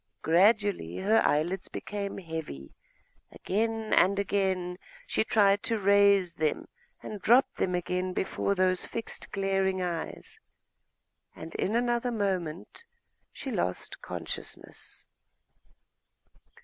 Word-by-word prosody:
Gradually 190 - +3
her 215 +4 +3
eyelids 175 +6 +1
became 200 -1 -5
heavy; 160 - -7 0.6
again 225 +2 -1
and 195 +2 +4
again 190 -3 0 0.3
she - - +1
tried 205 -2 +3
to 225 - -1
raise 200 -3 +4
them, 155 -2 -1 0.4
and 210 -2 -7
dropped 245 +7 +4
them 180 -1 0
again 180 +1 -1
before 190 +2 -1
those 185 -1 +2
fixed 230 - -6
glaring 195 -1 0
eyes...., 175 -3 -4 1.0
and 165 +1 -9
in 210 - -1
another 240 0 +1
moment 185 - -2 0.5
she - - -6
lost 90 +1 -2
consciousness.... - - -8
195 Hz, 105 wpm, -29 LUFS, 180-205 Hz, 1.0 s, and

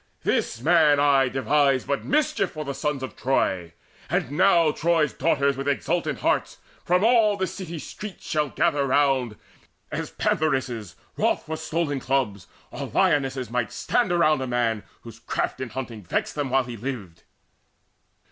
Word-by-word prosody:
This 115 - 0
man 155 -1 +5
aye 140 -2 +4
Devised 135 +1 +2
but 140 - -1
mischief 255 - +1
for 155 -1 -5
the 140 - -3
sons 145 -1 -2
of 130 - -6
Troy; 95 -10 0 0.4
And 125 - -1
now 170 -1 +4
Troy's 160 -2 +1
daughters 140 -4 +1
with 135 +1 -5
exultant 150 -2 -1
hearts - - 0 0.3
From 180 +2 +2
all 220 -3 +4
the 190 - 0
city 185 -2 -6
streets 210 +5 -8
shall 150 -2 0
gather 145 -4 +1
round, 135 -4 +2 0.6
As - - -3
pantheresses 130 - -1 0.2
wroth - - +1
for 160 - -4
stolen 160 -2 -2
cubs, 125 -9 -1 0.2
Or - - -5
lionesses, 135 -4 +1
might 120 -2 -1
stand 240 -7 0
around 155 -5 +3
a 130 - -2
man 120 -3 0 0.2
Whose 115 -1 -12
craft 120 - -3
in 130 - -4
hunting 115 -3 -6
vexed 90 - -2
them 145 -3 -2
while 135 +1 +3
he 120 -1 -7
lived. 110 -8 -6
140 Hz, 155 wpm, -24 LUFS, 125-160 Hz, 0.6 s, man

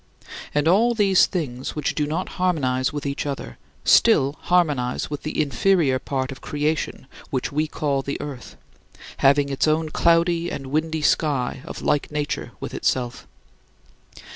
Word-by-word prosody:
And 150 +1 +2
all 225 +7 +4
these 195 -4 +4
things 130 -8 -4
which 150 - -1
do 150 -1 -1
not 165 +5 -2
harmonize 130 -8 +1
with 145 -1 -5
each 140 +1 -2
other 140 -1 -6 0.3
still 140 +2 +5
harmonize 150 -9 +1
with 145 - -4
the 155 - -4
inferior 150 -1 +2
part 130 -1 -3
of 135 - -9
creation 150 -1 -2 0.2
which 130 +2 -2
we 155 +2 0
call 145 -3 -1
the 140 +1 -4
earth, 140 -4 -8 0.6
having 140 +1 +4
its 135 +2 0
own 155 +1 +1
cloudy 170 +1 +2
and 135 -4 -6
windy 155 +1 -1
sky 135 -6 +1
of - - -8
like 145 -1 +1
nature 150 -1 -3
with - - -6
itself. 125 -2 -2
150 Hz, 150 wpm, -23 LUFS, 135-160 Hz, 0.6 s, still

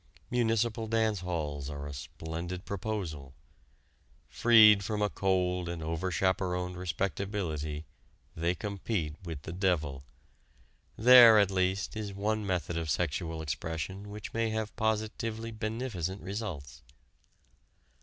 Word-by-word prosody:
Municipal 115 -1 +1
dance 110 -2 +1
halls 75 -6 -3
are 70 -1 -6
a 70 - -6
splendid 85 +6 -6
proposal. 90 -10 -4 0.9
Freed 110 -4 +7
from 105 +2 -2
a 105 0 +1
cold 90 -2 0
and 85 -2 -5
over 80 +3 -2
chaperoned 90 -1 0
respectability 90 -4 -3 0.5
they 85 +2 0
compete 100 -5 -3
with 80 -5 -6
the 80 - -6
devil. 80 -8 0 0.9
There, 120 -1 +9
at 100 -2 +4
least, 95 +1 0
is 105 -2 -5
one 105 +1 -1
method 85 -3 -1
of 80 -1 -4
sexual 80 0 -1
expression 80 +6 -4
which 105 0 -8
may 115 0 0
have 110 0 -3
positively 110 +1 -2
beneficent 110 -5 -4
results. 85 - -5
95 Hz, 115 wpm, -30 LUFS, 80-110 Hz, 0.9 s, There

